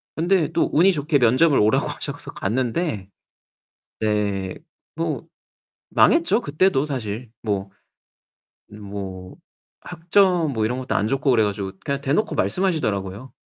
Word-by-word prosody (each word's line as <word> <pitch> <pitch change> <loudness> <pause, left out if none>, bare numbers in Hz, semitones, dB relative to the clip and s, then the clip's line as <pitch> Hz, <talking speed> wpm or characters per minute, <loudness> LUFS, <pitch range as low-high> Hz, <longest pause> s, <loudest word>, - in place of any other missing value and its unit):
근데 170 0 +1
또 170 - +2
운이 180 +6 +5
좋게 150 -2 +1
면접을 130 +5 +4
오라고 105 +1 +3
하셔서 - - -5
갔는데 120 - -2 0.9
네 100 -3 -1 0.4
뭐 165 -1 -3 0.7
망했죠, 330 -8 +4
그때도 150 - +1
사실. 120 -4 -4
뭐 100 -3 -2 1.0
뭐 100 -3 -8 0.4
학점 175 -1 +2
뭐 110 -3 0
이런 125 +3 -1
것도 130 - -3
안 105 - +1
좋고 135 +3 0
그래 115 -3 +4
가지고 100 -2 -2
그냥 140 0 -2
대놓고 145 +10 0
말씀하시더라고요. 130 - -1
130 Hz, 265 characters per minute, -22 LUFS, 105-165 Hz, 1.0 s, 운이